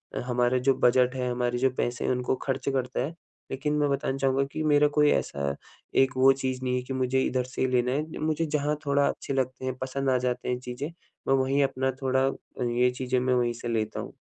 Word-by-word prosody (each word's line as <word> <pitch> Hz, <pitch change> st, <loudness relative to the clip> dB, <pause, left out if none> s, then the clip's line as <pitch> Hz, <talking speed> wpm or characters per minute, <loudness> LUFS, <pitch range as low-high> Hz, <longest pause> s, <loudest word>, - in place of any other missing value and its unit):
अ, -, -, -1 dB
हमारा 125 Hz, 0 st, +2 dB
जो 130 Hz, +2 st, +3 dB
बजट 125 Hz, +1 st, +4 dB
है, 125 Hz, -1 st, -1 dB
हमारे 120 Hz, 0 st, -1 dB
जो 130 Hz, +2 st, +3 dB
पैसे 120 Hz, 0 st, -1 dB
हैं -, -, +1 dB
उनको 125 Hz, +1 st, 0 dB
खर्च 135 Hz, 0 st, -1 dB
करता 130 Hz, -2 st, -1 dB
है, 160 Hz, -, -6 dB, 0.4 s
लेकिन 145 Hz, +3 st, -1 dB
मैं 145 Hz, -1 st, +2 dB
बताना 135 Hz, -1 st, -1 dB
चाहूँगा 135 Hz, 0 st, +2 dB
कि 155 Hz, -, -4 dB
मेरा 150 Hz, -1 st, +4 dB
कोई 150 Hz, -1 st, +4 dB
ऐसा 70 Hz, 0 st, -1 dB, 0.5 s
एक 130 Hz, -, 0 dB
वो 135 Hz, +1 st, +7 dB
चीज़ 130 Hz, -1 st, -3 dB
नहीं 125 Hz, -1 st, 0 dB
है 125 Hz, -, 0 dB
कि 135 Hz, +1 st, -5 dB
मुझे 130 Hz, 0 st, +1 dB
इधर 130 Hz, -1 st, 0 dB
से 130 Hz, 0 st, -6 dB
ही 130 Hz, -, +3 dB
लेना 125 Hz, 0 st, +2 dB
है। 155 Hz, +4 st, -3 dB
मुझे 155 Hz, +1 st, 0 dB
जहाँ 150 Hz, -1 st, 0 dB
थोड़ा 140 Hz, 0 st, +3 dB
अच्छे -, -, -3 dB
लगते 130 Hz, -1 st, -2 dB
हैं 130 Hz, -1 st, -2 dB
पसंद 135 Hz, +1 st, -2 dB
आ 130 Hz, -, +3 dB
जाते 125 Hz, 0 st, -2 dB
हैं 125 Hz, -, -1 dB
चीज़ें, 125 Hz, +3 st, -5 dB, 0.4 s
मैं 135 Hz, -, +4 dB
वहीं 135 Hz, +1 st, +2 dB
अपना 130 Hz, -1 st, 0 dB
थोड़ा 130 Hz, 0 st, +2 dB, 0.5 s
ये 125 Hz, +1 st, +3 dB
चीज़ें 130 Hz, 0 st, 0 dB
मैं 130 Hz, 0 st, +1 dB
वहीं 120 Hz, -1 st, +1 dB
से -, -, -4 dB
लेता 110 Hz, -1 st, -1 dB
हूँ। -, -, -7 dB
130 Hz, 230 wpm, -27 LUFS, 125-135 Hz, 0.5 s, वो